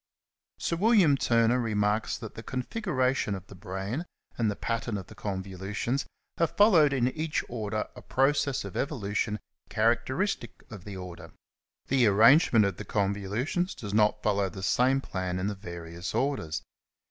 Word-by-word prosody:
Sir 170 - -1
William 195 -7 +5
Turner 115 -1 +3
^ - - 0
remarks 105 -1 0
that 110 -2 -8
*^ - - -31
the 115 - -8
configuration 130 - -1
of 95 0 -8
the 100 - -13
brain 95 - -4 0.3
and 115 -3 +1
the 105 - -2
pattern 115 -1 -2
of 95 - -6
the - - -13
convolutions 100 +6 -3 0.3
have 165 - 0
followed 175 -9 +6
in 130 -2 +2
each 155 +2 -2
order 110 -2 -3
a 125 - -10
process 135 -2 +1
of 100 - -8
evolution 105 -6 -1 0.3
characteristic 120 - 0
of 100 -5 -9
the 100 -2 -7
order, 90 -2 -9 0.5
the 130 -3 +4
arrangement 115 - +6
of 95 -3 -2
the - - -5
convolutions 105 - -1
does 100 -3 -6
not 105 0 +3
follow 100 -2 +1
the 95 +2 -8
same 130 +6 +3
plan 95 -6 -3
in 95 - -2
the 105 - -1
various 85 -2 -7
orders. 130 - -1
110 Hz, 160 wpm, -28 LUFS, 100-135 Hz, 0.5 s, followed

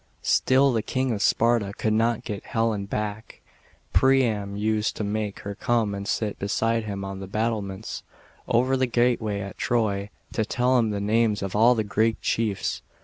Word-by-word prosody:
Still 135 0 +3
the 115 - +1
King 130 +3 -1
of 105 -3 -2
Sparta 115 -4 +2
could 110 - 0
not 115 +1 +1
get 105 -1 -5
Helen 115 -3 -1
back. 105 +1 -4 0.5
Priam 115 -7 +2
used 110 +1 0
to - - -3
make 105 0 -3
her 100 - -5
come 110 0 0
and 100 0 -5
sit 105 0 -2
beside 115 +3 0
him 100 -2 -4
on 95 0 -6
the 95 - -7
battlements, 105 -1 -3 0.5
over 125 +2 +2
the 130 -1 +1
gateway 120 -4 +1
at 100 -1 -8
Troy, 105 -4 0 0.2
to 110 - +1
tell 125 +3 +2
him 115 -2 +1
the 105 -1 -2
names 105 0 +1
of 95 0 -4
all 115 +4 +5
the 110 - 0
Greek 110 +2 +1
chiefs. 105 -4 -1
110 Hz, 175 wpm, -25 LUFS, 100-115 Hz, 0.5 s, all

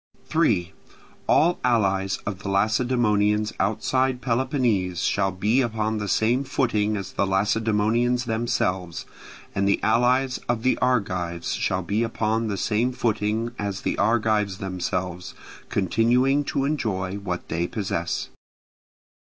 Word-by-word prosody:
3. 100 - +1 0.5
All 175 +2 +3
allies 100 -5 +1
of 100 -2 -4
the 100 - -5
Lacedaemonians 105 0 +2
outside 125 +6 +1
Peloponnese 120 - 0
shall 95 -1 +1
be 105 +8 +1
upon 110 -2 -1
the 105 - -3
same 120 +7 +2
footing 110 -6 0
as 95 -1 -6
the 100 - 0
Lacedaemonians 110 +5 +1
themselves, 95 -7 -1 0.5
and 100 0 0
the 100 - +2
allies 125 +3 +2
of 120 -2 0
the 130 - +3
Argives 90 -9 -1
shall 95 0 -1
be 100 +6 -1
upon 115 0 0
the 100 -2 -2
same 115 +5 +1
footing 110 -1 -1
as 100 -1 -3
the - - -1
Argives 110 -3 +1
themselves, 90 -2 -4 0.3
continuing 120 +8 +2
to 135 - -1
enjoy 105 -10 -2
what 90 -3 -5
they 85 +1 -1
possess. 90 -5 -3
110 Hz, 125 wpm, -24 LUFS, 95-120 Hz, 0.5 s, All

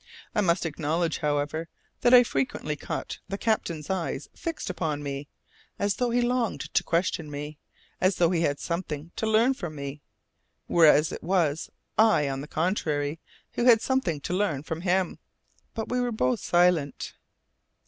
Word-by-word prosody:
I - - +2
must 175 -2 +2
acknowledge, 160 +1 -1
however, 150 +2 -1 0.3
that 240 - +3
I 250 -1 +9
frequently 150 - -2
caught - - -5
the 195 - -2
captain's 170 -9 -1
eyes 190 -3 -2
fixed 330 -1 -5
upon 155 -5 -2
me, 140 0 -4 0.5
as 200 0 0
though 245 -1 +1
he 240 +1 +2
longed 240 -2 -1
to - - +3
question 165 -2 0
me, 150 +1 -6 0.4
as 185 +1 +3
though 170 -1 +3
he 170 -2 +1
had 145 -3 +1
something 170 -2 -4
to 220 - -1
learn 225 +4 +4
from 175 -11 -6
me, 140 0 -6 0.6
whereas 155 -2 +5
it - - -6
was 165 -4 +1 0.3
I, 215 -10 +5
on 135 0 -3
the 145 - -7
contrary, 155 -3 -1 0.3
who 240 - -1
had 235 -3 +7
something 225 - 0
to 175 - -3
learn 180 -8 0
from 160 +1 -4
him. 185 0 0 0.6
But 225 -2 -3
we 250 - 0
were 245 -1 0
both 125 - +1
silent. 175 -5 +2
170 Hz, 165 wpm, -27 LUFS, 150-205 Hz, 0.6 s, I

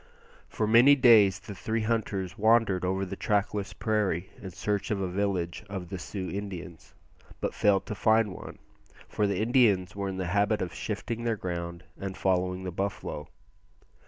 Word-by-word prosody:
For 110 - -1
many 120 +6 +7
days 110 -8 +6
the 105 - -9
three 110 +5 -2
hunters 105 -5 -1
wandered 110 -4 +3
over 95 +1 0
the 95 +1 -6
trackless 100 0 -1
prairie 100 -5 -1
in 95 - -6
search 100 +3 -2
of 105 - 0
a 95 - -1
village 90 -2 -2
of 95 -4 -6
the 95 - -5
Sioux 95 0 -5
Indians, 95 -4 -7 0.4
but - - -2
failed 100 -2 +2
to 110 - -4
find 110 -1 +2
one, - - -9 0.5
for 105 - 0
the 100 - -1
Indians 110 -6 +3
were 100 -1 -2
in 95 - -5
the 95 - -2
habit 105 +1 +2
of 90 - -3
shifting 115 +2 -4
their 115 -2 0
ground 85 -2 -5 0.2
and 95 -1 -5
following 95 -1 0
the 90 - -4
buffalo. 95 -5 -4
100 Hz, 170 wpm, -28 LUFS, 95-110 Hz, 0.5 s, many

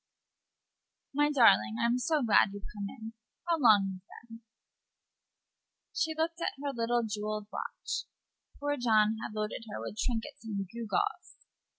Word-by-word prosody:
"My 295 +1 +3
darling, 225 - +5
I'm 235 +1 +2
so 305 +1 +1
glad 215 -3 +5
you've 205 - -8
come 205 -1 -4
in. 225 +2 -9 0.3
How 335 -1 +2
long 215 -7 +6
you've 185 -1 -7 0.3
been!" 230 0 -11 1.5
She 320 -1 0
looked 330 +2 -1
at - - 0
her 285 0 -2
little 235 0 +1
jewelled 210 -1 -3
watch. - - -4 0.5
Poor 290 0 -1
John 220 -3 +3
had 215 - -6
loaded 215 +2 -3
her 210 - -5
with 215 - -6
trinkets 225 -2 -2
and 200 -3 -3
gewgaws. 235 - -2
230 Hz, 145 wpm, -31 LUFS, 210-285 Hz, 1.5 s, long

